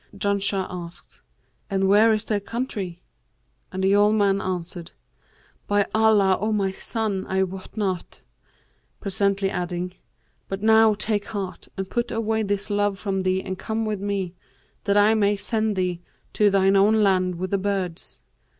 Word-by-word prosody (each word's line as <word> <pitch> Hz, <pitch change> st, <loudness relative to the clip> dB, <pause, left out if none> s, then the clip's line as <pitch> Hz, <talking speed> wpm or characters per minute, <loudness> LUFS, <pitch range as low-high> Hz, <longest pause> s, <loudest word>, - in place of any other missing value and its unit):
Janshah 200 Hz, -1 st, 0 dB
asked, 175 Hz, -1 st, -8 dB, 0.5 s
'And 195 Hz, -1 st, 0 dB
where 205 Hz, +4 st, +5 dB
is 215 Hz, 0 st, +1 dB
their 210 Hz, -2 st, 0 dB
country?'; 200 Hz, -5 st, -4 dB, 0.7 s
and 190 Hz, 0 st, -3 dB
the 195 Hz, +1 st, +4 dB
old 210 Hz, +1 st, +4 dB
man 200 Hz, -2 st, +2 dB
answered, 175 Hz, -1 st, -4 dB, 0.7 s
'By 205 Hz, -1 st, +2 dB
Allah, 215 Hz, -4 st, +4 dB
O 215 Hz, +1 st, 0 dB
my 200 Hz, -3 st, +1 dB
son, 205 Hz, -1 st, -3 dB
I 190 Hz, 0 st, +2 dB
wot 190 Hz, +3 st, -7 dB
not:' 190 Hz, -4 st, -2 dB, 0.8 s
presently 200 Hz, -1 st, 0 dB
adding, 180 Hz, 0 st, -3 dB, 0.5 s
'but 195 Hz, +1 st, -5 dB
now 220 Hz, -1 st, +6 dB
take 210 Hz, 0 st, -1 dB
heart 195 Hz, -3 st, -5 dB
and 195 Hz, 0 st, -3 dB
put 235 Hz, +5 st, -2 dB
away 220 Hz, 0 st, 0 dB
this 205 Hz, 0 st, -2 dB
love 205 Hz, -1 st, +1 dB
from 195 Hz, -2 st, -2 dB
thee 185 Hz, 0 st, 0 dB
and 185 Hz, 0 st, -5 dB
come 220 Hz, 0 st, -2 dB
with 210 Hz, -2 st, -2 dB
me, 200 Hz, -3 st, -2 dB, 0.5 s
that 200 Hz, 0 st, +2 dB
I 205 Hz, +2 st, +5 dB
may 205 Hz, -2 st, +3 dB
send 215 Hz, +1 st, -1 dB
thee 180 Hz, -2 st, -1 dB, 0.3 s
to 210 Hz, -1 st, +4 dB
thine 195 Hz, 0 st, +3 dB
own 210 Hz, +3 st, +4 dB
land 185 Hz, -2 st, +2 dB
with 185 Hz, +2 st, -4 dB
the 200 Hz, -, +1 dB
birds.' 190 Hz, -4 st, -3 dB
200 Hz, 160 wpm, -24 LUFS, 190-210 Hz, 0.8 s, now